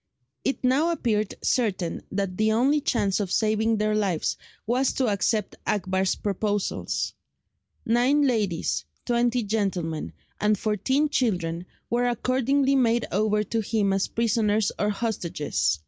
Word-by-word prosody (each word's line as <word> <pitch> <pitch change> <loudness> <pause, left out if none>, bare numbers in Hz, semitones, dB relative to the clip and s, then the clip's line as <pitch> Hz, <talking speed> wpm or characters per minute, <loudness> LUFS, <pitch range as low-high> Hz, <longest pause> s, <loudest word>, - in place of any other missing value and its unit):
It 270 - -1
now 270 +6 +3
appeared 215 - 0
certain 195 -9 0
that 195 -2 -2
the 220 0 +2
only 275 +6 +3
chance 205 -8 +1
of 195 -3 -2
saving 220 +1 +2
their 215 0 +1
lives 195 -7 0 0.3
was 250 +4 +1
to 255 -4 +1
accept 205 +1 0
Akbar's 190 -1 +1
proposals. 205 0 -2 0.7
Nine 250 +6 +3
ladies, 210 - 0 0.2
twenty 240 0 +1
gentlemen, 195 -7 -2 0.3
and 210 0 +2
fourteen 260 +9 +1
children 180 - -1 0.2
were 245 +1 +1
accordingly 265 +3 +1
made 240 -3 +2
over 210 +1 +1
to 225 +2 -2
him 205 -2 +1
as 195 0 +1
prisoners 220 -2 +1
or 210 - +1
hostages. 165 - -1
215 Hz, 130 wpm, -25 LUFS, 195-240 Hz, 0.7 s, now